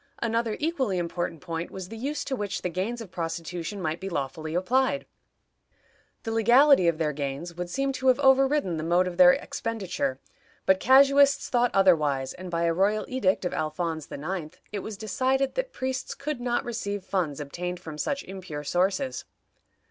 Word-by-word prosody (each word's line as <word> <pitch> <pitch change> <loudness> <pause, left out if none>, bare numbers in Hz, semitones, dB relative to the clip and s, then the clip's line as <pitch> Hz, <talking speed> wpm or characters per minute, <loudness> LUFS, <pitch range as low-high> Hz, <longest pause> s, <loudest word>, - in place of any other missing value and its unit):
Another 230 -1 -1
equally 275 - 0
important 170 -2 -3
point 165 -1 -4
was 190 -1 -8
the 225 - -7
use 280 +7 -3
to 270 - -2
which 205 -4 -4
the 180 - -1
gains 210 +7 -2
of 205 -6 -9
prostitution 170 +2 -4
might 160 -2 -2
be 195 - -5
lawfully 155 +1 -4
applied. 260 +9 +1 1.2
The 225 - -3
legality 235 -1 +5
of 170 -2 +2
their 155 -2 0
gains 140 +4 -4
would 175 +1 -5
seem 275 +6 0
to 260 0 -2
have 255 - +6
overridden 270 - +3
the 155 - -3
mode 175 +3 +3
of 180 -1 -5
their 180 -1 +8
expenditure, 190 -12 -3 0.5
but 190 0 +4
casuists 275 +3 +5
thought 245 -1 +3
otherwise, 150 -9 +3
and, 185 0 -8
by 170 -1 -1
a 170 0 +2
royal 200 +5 +1
edict 195 -8 0
of 180 - -1
Alphonse 160 0 -3
IX., 165 +2 -5
it 210 - -3
was 210 +1 -6
decided 260 +6 0
that - - -2
priests 260 0 -3
could 290 -3 -4
not 240 0 0
receive 205 -4 -3
funds 170 -8 -2
obtained 175 +5 -5
from 160 -4 -8
such 280 - -1
impure 185 -6 -7
sources. 185 - 0
190 Hz, 175 wpm, -27 LUFS, 170-245 Hz, 1.2 s, their